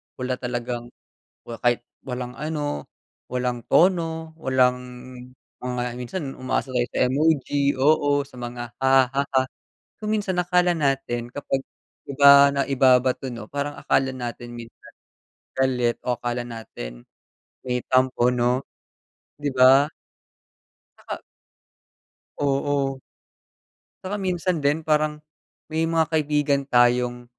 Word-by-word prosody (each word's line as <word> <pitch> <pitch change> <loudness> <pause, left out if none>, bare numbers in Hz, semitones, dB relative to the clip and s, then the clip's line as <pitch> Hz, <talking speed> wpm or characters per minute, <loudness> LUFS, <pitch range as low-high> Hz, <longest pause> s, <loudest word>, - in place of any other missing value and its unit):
wala 130 0 -3
talagang 120 -1 -4 0.6
wa 115 - -6
kahit 120 -1 +2 0.2
walang 125 -1 -5
ano, 150 - -3 0.5
walang 125 -2 -2
tono, 165 -3 +2
walang 125 -2 +2 0.8
mga 125 -1 -3 0.2
minsan 140 +9 -4 0.2
umaasa 130 +1 -2
tayo 120 -1 +1
sa - - 0
emoji, 140 0 +1
oo 145 0 +3
sa 140 - -17
mga, 120 -1 -6
"hahahaha." 135 0 +3 0.6
Kung 215 0 -2
minsan 200 -4 -1
akala 180 0 +2
natin 135 -5 -1
kapag 135 -1 -2 0.5
iba 140 0 +7
na 140 - +2
ibabato 130 -1 +3
'no, 115 -3 -8
parang 145 +1 -3
akala 135 0 +1
natin 120 -1 -6
minsan 115 -1 -12 0.6
galit 125 -3 +1
o 125 - +1
akala 120 0 -2
natin - - -8 0.6
may 125 0 0
tampo 130 -1 +3
'no, 125 +1 +1 0.8
di 145 0 -3
ba. 130 +2 +6 1.1
Naka - - -7 1.2
Oo. 140 -1 0 1.1
Saka 200 +2 -3
minsan 180 -2 -1
din 145 +3 +1
parang, 155 -1 +1 0.6
may 160 +1 +1
mga 165 -1 +3
kaibigan 150 -2 +2
tayong 120 0 +3
130 Hz, 110 wpm, -24 LUFS, 125-145 Hz, 1.2 s, iba